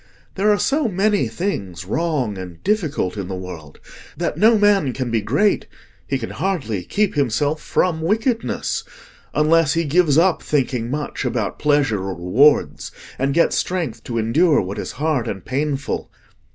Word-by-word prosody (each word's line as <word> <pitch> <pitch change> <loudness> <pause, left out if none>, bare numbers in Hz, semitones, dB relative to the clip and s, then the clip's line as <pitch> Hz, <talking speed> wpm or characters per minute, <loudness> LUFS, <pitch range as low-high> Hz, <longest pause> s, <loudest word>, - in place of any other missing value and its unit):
There 200 +2 +1
are 205 - +3
so 285 +5 +1
many 205 +1 +1
things 95 - -4
wrong 140 - -1
and 90 -3 -9
difficult 155 - -1
in 100 -3 -4
the 95 - -4
world, 90 -5 -9 0.4
that - - -2
no 220 +2 +5
man 200 -10 +3
can 130 -2 -3
be 115 -1 +1
great—he 195 - -1
can 115 -3 -6
hardly 145 - -2
keep 205 - 0
himself 145 +2 0
from 165 -3 0
wickedness—unless 165 - 0
he 165 0 +1
gives 155 -1 +3
up 175 +1 +3
thinking 125 -5 -1
much 145 +2 -3
about 120 -6 -2
pleasure 145 -9 +2
or 95 0 -4
rewards, 110 - +2 0.3
and 135 +2 0
gets 170 - +3
strength 165 -11 -2
to 115 - -3
endure 145 +9 +3
what 95 +1 -4
is - - -5
hard 145 -4 -1
and 95 -4 -5
painful. 140 +1 -2
145 Hz, 150 wpm, -20 LUFS, 110-180 Hz, 0.4 s, no